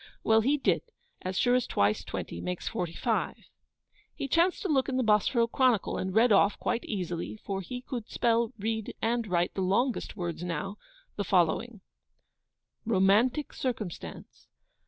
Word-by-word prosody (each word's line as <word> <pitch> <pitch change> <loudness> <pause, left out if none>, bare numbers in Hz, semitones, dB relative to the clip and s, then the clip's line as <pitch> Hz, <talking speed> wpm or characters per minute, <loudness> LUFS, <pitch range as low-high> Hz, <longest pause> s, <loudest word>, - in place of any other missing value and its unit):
Well, 220 0 +5
he 275 +6 +2
did, 275 - +2 0.4
as 185 0 -3
sure 245 - +3
as 250 -1 +2
twice 100 +1 +1
twenty 85 - -5
makes 180 -1 -4
forty 170 -2 -3
five) - - -1 0.8
he 275 - -3
chanced 335 +6 +2
to - - 0
look 275 -5 +2
in 260 - -1
the 260 - +2
Bosforo 220 +2 +3
Chronicle, 240 -3 +1
and 190 - -2
read 230 +2 +5
off, 200 0 +4
quite 235 - -1
easily 180 -2 -4
(for 195 -2 -4
he 245 +7 -6
could 240 -3 -6
spell, 230 0 +1
read, 220 +1 -3
and 230 0 0
write 175 -2 +1
the 195 - -2
longest 225 +9 0
words 175 -2 -4
now), 180 +4 -3 0.4
the - - 0
following: - - +1 1.0
'ROMANTIC 225 +7 +2
CIRCUMSTANCE. 215 - -5
220 Hz, 155 wpm, -29 LUFS, 185-245 Hz, 1.0 s, Well